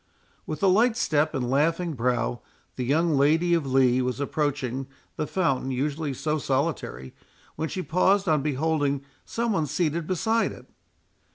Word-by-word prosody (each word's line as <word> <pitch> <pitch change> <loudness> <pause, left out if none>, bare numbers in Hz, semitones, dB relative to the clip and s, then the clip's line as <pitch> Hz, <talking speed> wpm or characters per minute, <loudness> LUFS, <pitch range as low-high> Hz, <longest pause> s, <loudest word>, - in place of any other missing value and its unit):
With 155 - -5
a - - +5
light 220 +5 +4
step 155 -4 +1
and 125 -2 -1
laughing 165 +6 +1
brow 120 -1 -1 0.3
the 130 - -3
young 155 +5 +2
Lady 160 +5 +3
of 150 -6 0
Lee 130 -1 +4
was 125 0 -2
approaching, 140 -3 -2 0.3
the 150 - -2
fountain 150 -8 0
usually 145 +3 -2
so 150 +4 -2
solitary, 135 - -2 0.4
when 160 0 -3
she 185 - -4
paused 190 +4 +2
on 155 -3 +3
beholding 145 -1 0 0.2
some 235 0 -1
one 165 -7 0
seated 165 +1 -1
beside 220 +5 +1
it. - - -14
150 Hz, 155 wpm, -26 LUFS, 135-170 Hz, 0.4 s, a